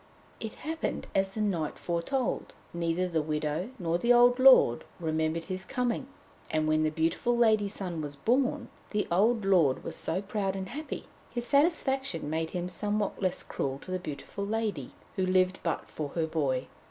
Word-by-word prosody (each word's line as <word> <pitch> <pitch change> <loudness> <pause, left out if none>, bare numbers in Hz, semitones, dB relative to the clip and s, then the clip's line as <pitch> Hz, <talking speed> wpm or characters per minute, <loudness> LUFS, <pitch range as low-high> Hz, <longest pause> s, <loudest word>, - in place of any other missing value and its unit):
It 220 -1 -5
happened 320 +1 -2
as 195 0 +1
the 215 - -1
knight 175 -8 -1
foretold. 180 +10 -2 0.2
Neither 170 +1 0
the 165 -3 0
widow 150 +4 -2
nor 170 -3 0
the 235 - +3
old 245 +1 +6
lord 255 - +7 0.2
remembered 160 0 0
his 185 +1 -3
coming, 250 +3 -1 0.4
and 155 0 +1
when 155 0 +3
the 155 - +2
beautiful 165 +10 0
lady's 215 -3 +3
son 175 -5 -4
was 145 -1 -5
born, 255 - +1 0.2
the 210 -1 0
old 215 +4 +3
lord 170 -9 +3
was - - -3 0.2
proud 195 -2 -1
and 190 -1 -4
happy. 300 +4 -5 0.3
His 240 -1 -3
satisfaction 280 - +1
made 160 0 -1
him 180 0 -3
somewhat 205 +3 -1
less 185 -2 0
cruel 135 -1 -3
to 185 - -8
the 185 - -1
beautiful 155 +4 -6
lady, 205 - -2 0.2
who 190 - +2
lived 185 0 +3
but 170 - -2
for 150 -2 -5
her 165 -2 +1
boy. 140 -5 0
185 Hz, 170 wpm, -29 LUFS, 160-230 Hz, 0.4 s, lord